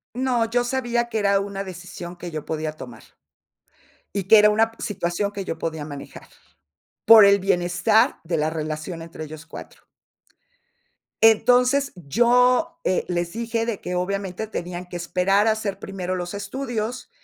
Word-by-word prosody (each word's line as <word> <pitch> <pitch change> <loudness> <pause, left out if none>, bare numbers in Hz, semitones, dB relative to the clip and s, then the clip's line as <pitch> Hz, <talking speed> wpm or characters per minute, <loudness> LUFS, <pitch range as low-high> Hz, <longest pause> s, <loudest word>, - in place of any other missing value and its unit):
No, 250 -2 +1
yo 240 +2 0
sabía 240 -1 -1
que 225 - -2
era 200 -2 +2
una 195 0 -4
decisión 180 -1 -9
que 175 0 -7
yo 155 -3 -6
podía 155 -1 -3
tomar, 120 -7 -11 1.1
y 200 -1 -2
que 215 +4 +7
era 210 0 +6
una 225 +2 +2
p - - -22
situación 200 0 -2
que 200 -1 -5
yo 165 - -4
podía 160 -2 -4
manejar, 145 -2 -10 0.8
por 225 -2 +10
el 200 0 +6
bienestar 180 +4 +2
de 165 0 -1
la 155 +1 0
relación 155 +2 -5
entre 165 -1 -8
ellos 155 +1 -10
4. - - -12 1.4
Entonces, 250 +5 +4
yo, 250 - +2
eh, 185 - 0
les 175 -1 -2
dije 230 +1 -2
de 230 -4 -3
que 180 - -4
obviamente 195 +2 -3
tenían 180 -4 -6
que 175 - -5
esperar 185 +4 +1
a - - +5
hacer 210 -3 -3
primero 185 -2 -4
los 175 -1 -5
estudios, 235 +3 -4
195 Hz, 160 wpm, -23 LUFS, 175-225 Hz, 1.4 s, por